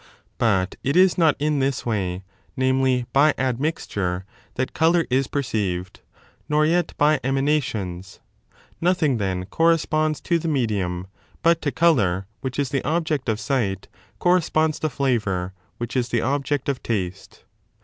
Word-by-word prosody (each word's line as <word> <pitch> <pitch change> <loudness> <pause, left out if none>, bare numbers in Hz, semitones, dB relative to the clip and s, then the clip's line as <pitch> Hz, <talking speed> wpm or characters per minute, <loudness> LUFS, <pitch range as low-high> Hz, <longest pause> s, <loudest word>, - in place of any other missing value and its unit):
But 95 -5 +1
it 140 - 0
is 185 0 +5
not 160 -4 +4
in 150 0 0
this 135 -1 -1
way, 95 -5 -2 0.3
namely, 130 -1 +2
by 145 +3 +4
admixture, 120 - -2 0.3
that 130 +1 -2
colour 165 +1 +3
is 130 +1 +2
perceived, 100 -10 -2 0.5
nor 150 0 +3
yet 175 +2 0
by 150 0 +3
emanations. 130 -10 -1 0.6
Nothing, 165 -7 +2
then, 95 -2 -2
corresponds 155 - +1
to 170 -2 +1
the 165 - -4
medium; 100 - -1 0.4
but 170 0 +4
to 145 - -1
colour, 110 - +2
which 130 -1 -5
is 140 -3 0
the 140 -1 -1
object 155 -5 -1
of 110 -1 0
sight, 110 -5 -1 0.3
corresponds 160 -3 +2
the 155 - -1
flavour, 105 -10 -1 0.2
which 120 +2 -5
is 125 -1 0
the 120 - +1
object 140 +1 -1
of 140 -2 0
Moisture 115 - -2 0.2
vaste. 95 +2 -18
135 Hz, 145 wpm, -23 LUFS, 105-155 Hz, 0.6 s, is